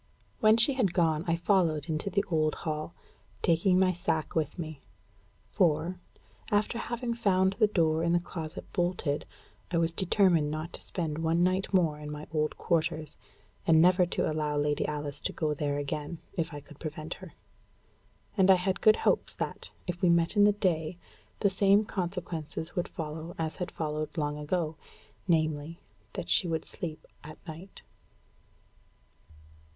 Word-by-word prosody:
When 215 +1 +6
she 235 +5 +6
had 220 -10 +1
gone, 160 -3 +2
I 165 - +3
followed 170 -4 +2
into 160 +4 -1
the 200 0 +1
old 155 -2 +1
hall, 155 +1 -3 0.5
taking 175 +3 +3
my 185 0 +4
sack 165 -3 -1
with 160 0 -1
me; 155 -4 -6 0.7
for, 175 0 +1 0.5
after 210 +3 +1
having 240 0 -3
found 190 -5 +2
the 215 +1 +3
door 160 -5 +2
in 170 0 +1
the 175 - +4
closet 170 -1 -6
bolted, 175 -5 -1 0.4
I 175 - 0
was 165 0 +2
determined 175 -3 +3
not 155 +3 -4
to - - -6
spend 160 -4 -1
one 165 +1 +2
night 185 +1 +1
more 165 -6 +2
in 150 0 -7
my 150 0 -6
old 155 -1 0
quarters, 155 -2 -1 0.5
and 160 -1 +6
never 180 +1 +5
to - - -1
allow 150 -1 -1
Lady 145 0 +1
Alice 145 -1 -4
to - - -3
go 155 -2 0
there 145 -1 -1
again, 145 +3 -3 0.2
if 170 -4 -2
I 145 -1 -7
could 150 +1 -16
prevent 155 0 -5
her. 185 -3 -10 1.0
And 190 -2 +4
I 190 - +9
had 185 +1 -1
good 215 0 +7
hopes - - +1
that, - - -3 0.2
if 175 0 -4
we 180 - +4
met 170 +3 +3
in 205 0 +6
the 210 - +6
day, 170 -4 0 0.4
the 200 - +4
same 200 +2 +4
consequences 170 -4 -4
would 175 - -1
follow 160 +1 -6
as 160 -1 -3
had 180 - -3
followed 155 0 -4
long 150 -1 -1
ago 160 +1 -1 0.5
namely, 155 -1 0 0.3
that - - -5
she 180 - +3
would 160 -1 -2
sleep 165 -5 -6 0.2
at 155 0 -10
night. 170 +5 -10
165 Hz, 165 wpm, -29 LUFS, 155-185 Hz, 1.0 s, I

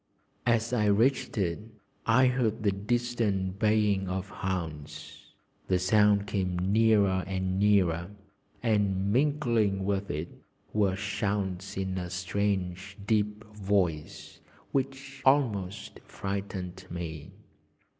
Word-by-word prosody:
As 115 0 +2
I 105 -4 +2
reached 115 +6 +2
it 85 -5 0 0.5
I 125 +3 +5
heard 120 -3 +1
the 100 - +3
distant 100 -3 -1
baying 105 -3 +2
of 95 +1 -3
hounds; 85 -8 -5 0.4
the 90 - +3
sound 100 +2 +4
came 95 -3 -1
nearer 100 0 +3
and 95 0 -1
nearer, 90 -4 +3 0.5
and 100 -3 +1
mingling 120 -8 +2
with 100 0 -1
it 75 +3 -5 0.3
were 100 -3 +2
shouts 100 -1 -2
in 95 -1 -2
a 90 -1 -5
strange 95 +1 -2
deep 105 0 0
voice, 95 -7 -1 0.3
which 135 0 -3
almost 110 -8 +1
frightened 95 -2 -5
me. 80 -4 -6
100 Hz, 105 wpm, -29 LUFS, 95-110 Hz, 0.5 s, I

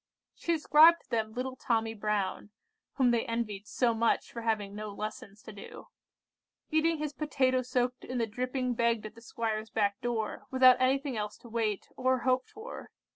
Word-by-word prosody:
She 340 - -3
described 320 +1 +6
to - - -33
them 220 -2 -1
little 255 +2 -4
Tommy 225 -3 0
Brown, 210 -2 -2 0.4
(whom 255 -3 +3
they 235 -1 +2
envied 215 -3 -3
so 240 -2 +1
much 225 +1 +1
for 235 - -6
having 215 -3 -1
no 210 +1 -5
lessons 210 0 -7
to - - -10
do,) 200 - -11 0.8
eating 320 +1 +2
his 300 -1 -3
potatoe 265 -3 +1
soaked 250 0 -1
in 255 - -4
the 230 - +1
dripping 250 +3 -2
begged 235 -2 +1
at 215 - -7
the 230 - -15
squire's 220 -2 -3
back 205 -1 0
door, 230 -3 -3
without 260 -1 +6
anything 265 0 +1
else 210 0 -4
to 235 - -14
wait—or 230 +3 -1
hope 255 0 +1
for. 445 +4 -9
235 Hz, 175 wpm, -30 LUFS, 215-260 Hz, 0.8 s, described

